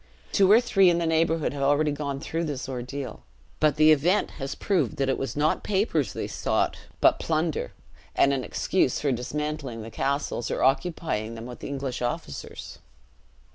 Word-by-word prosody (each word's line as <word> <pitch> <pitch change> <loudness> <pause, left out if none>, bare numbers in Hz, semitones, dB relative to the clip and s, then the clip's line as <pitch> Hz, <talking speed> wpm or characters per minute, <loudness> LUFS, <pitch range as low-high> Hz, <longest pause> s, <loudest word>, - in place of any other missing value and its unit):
Two 195 0 +4
or 220 - +8
three, 195 -6 +4
in 170 - +2
the 170 - 0
neighborhood 160 -2 +1
have 140 - -5
already 145 +2 +3
gone 140 -1 -3
through 165 +4 -3
this 145 -4 -4
ordeal; 130 +1 -5 0.4
but 155 -2 +3
the 155 +1 +6
even 170 +7 +3
has 135 -2 -6
proved 195 -3 0
that 135 -1 0
it 135 - +1
was 135 -5 -3
not 150 +2 +1
papers 190 - 0
they - - -3
sought, - - 0 0.3
but - - +5
plunder, 160 0 -1 0.4
and 140 - +4
an 130 -2 -1
excuse 160 -3 0
for 145 - 0
dismantling 135 -1 -3
the 115 - -9
castles, 140 -2 -1
or - - -1
occupying 135 -5 0
them 115 0 -7
with 125 0 -9
English 135 -3 -4
officers. 120 0 -5
145 Hz, 175 wpm, -26 LUFS, 135-160 Hz, 0.4 s, or